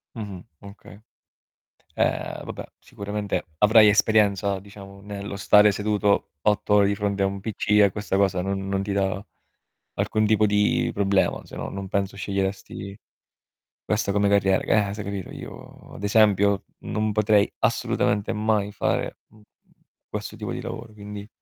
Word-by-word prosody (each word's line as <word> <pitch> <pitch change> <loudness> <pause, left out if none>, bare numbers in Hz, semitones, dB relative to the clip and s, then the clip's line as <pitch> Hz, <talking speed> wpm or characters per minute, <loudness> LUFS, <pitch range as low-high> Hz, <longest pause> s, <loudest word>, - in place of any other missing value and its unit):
Mh-mh. 100 -5 -6 0.2
Okay. 100 +1 -13 1.0
Ehm, - - -1
vabbè, - - -7
sicuramente 100 0 -4
avrai 110 +1 +7
esperienza, 100 -2 +3
diciamo, 100 0 -13
nello 100 0 -6
stare 105 +1 +6
seduto 105 0 0
8 105 +1 +1
ore 100 -1 +5
di 100 - 0
fronte 100 -1 -1
a - - +3
un 100 0 -2
PC, 105 0 -5
e 100 -2 +5
questa 100 -1 -2
cosa 95 -2 +2
non 95 +1 -3
non 95 0 -1
ti 100 - -4
dà 100 0 -1 0.7
alcun 110 0 0
tipo 110 0 +3
di 105 0 +2
problema, 100 -1 +1
se - - -11
no - - -4
non 100 0 -6
penso 100 0 -2
sceglieresti 100 0 -4 0.9
questa 105 -2 0
come 100 0 +2
carriera. 95 -2 +3
G - - -13 0.2
eh, - - -5
se, 105 - -5
capito. 100 -2 -5
Io, - - -11
ad 100 - -8
esempio, 100 -2 +3 0.2
non 110 0 -2
potrei 105 -1 +3
assolutamente 105 0 0
mai 105 -1 0
fare, 100 - -1
mhmm, 110 0 -21 0.7
questo - - -6
tipo - - -5
di - - -4
lavoro, 115 -1 -7
quindi 105 0 -9
100 Hz, 155 wpm, -24 LUFS, 100-105 Hz, 1.0 s, avrai